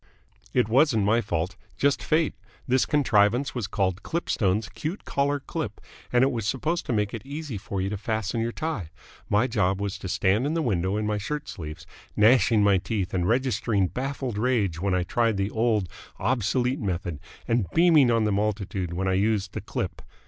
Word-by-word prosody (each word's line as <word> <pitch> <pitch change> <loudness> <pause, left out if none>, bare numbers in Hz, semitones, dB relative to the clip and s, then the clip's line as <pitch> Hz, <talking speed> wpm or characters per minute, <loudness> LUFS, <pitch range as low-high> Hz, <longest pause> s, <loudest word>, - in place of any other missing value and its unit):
"It 125 -4 +2
wasn't 120 -3 +3
my 115 +3 +3
fault. 90 -2 -2 0.2
Just 140 0 +2
Fate. 160 0 +1 0.3
This 130 0 +2
contrivance 125 -1 +3
was 120 -6 -3
called 95 -2 -1
Klipstone's 105 - 0
Kute 160 - -5
Kollar 140 +1 0
Klip, - - -5 0.3
and 125 +1 +4
it 135 - +3
was 115 -5 -3
supposed 155 +8 -1
to - - -1
make 105 -2 0
it 115 - -4
easy 145 -1 -6
for 100 0 -4
you 95 - -1
to 105 - -2
fasten 110 0 -2
your 115 +1 -1
tie. 125 - -3 0.4
My 105 +4 +3
job 100 -6 +1
was 100 -1 -3
to 95 - -6
stand 100 +6 +2
in 155 - -1
the 165 - 0
window 95 - 0
in 105 - -1
my 105 0 0
shirt 150 +8 -4
sleeves, 80 - -7 0.3
gnashing 115 0 +5
my 100 -2 +4
teeth 100 -1 -3
and 90 -1 0
registering 115 -5 +1
baffled 130 -4 -3
rage 105 -9 +1
when 95 -1 +1
I 90 - +1
tried 115 +3 +1
the 100 +1 -1
old, 110 -4 +1 0.3
obsolete 125 +2 0
method 85 -6 -3 0.3
and 115 -7 +1
beaming 160 - +5
on 115 -1 +3
the 105 - +1
multitude 100 -3 -1
when 95 +2 -1
I 95 - +2
used 100 0 +1
the - - -4
Klip. - - -4
110 Hz, 190 wpm, -26 LUFS, 100-130 Hz, 0.4 s, gnashing